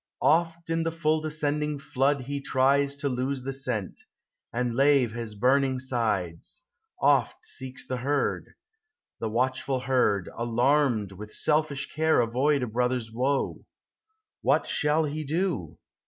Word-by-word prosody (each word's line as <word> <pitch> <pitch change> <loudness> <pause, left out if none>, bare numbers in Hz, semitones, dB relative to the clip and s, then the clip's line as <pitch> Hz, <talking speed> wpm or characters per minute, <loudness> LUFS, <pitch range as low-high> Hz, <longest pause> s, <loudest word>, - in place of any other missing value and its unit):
Oft 165 0 +2
in 165 0 +1
the 165 0 -1
full 155 -1 +1
descending 150 -1 -1
flood 140 0 0
he 140 +2 -4
tries 140 +1 +2
To 140 0 -2
lose 130 0 -2
the 135 +1 -3
scent, 125 -7 -3 0.5
and 120 0 -1
lave 135 -2 +4
his 115 -2 -6
burning 130 +4 +2
sides; 110 - -2 0.2
— 445 0 -41
Oft - - +2
seeks 130 - -6
the 130 - -3
herd; 140 +3 -1 0.6
the 115 - -2
watchful 130 +3 0
herd, 125 -8 +1
alarmed, 120 -2 +1
With 105 +3 -9
selfish 150 -2 0
care 160 0 +3
avoid 130 +4 +2
a - - -1
brother's 125 0 -1
woe. 130 +4 -1 0.8
What - - +2
shall 150 +2 +1
he 155 +1 -3
do? 155 - -2
135 Hz, 140 wpm, -27 LUFS, 120-150 Hz, 0.8 s, lave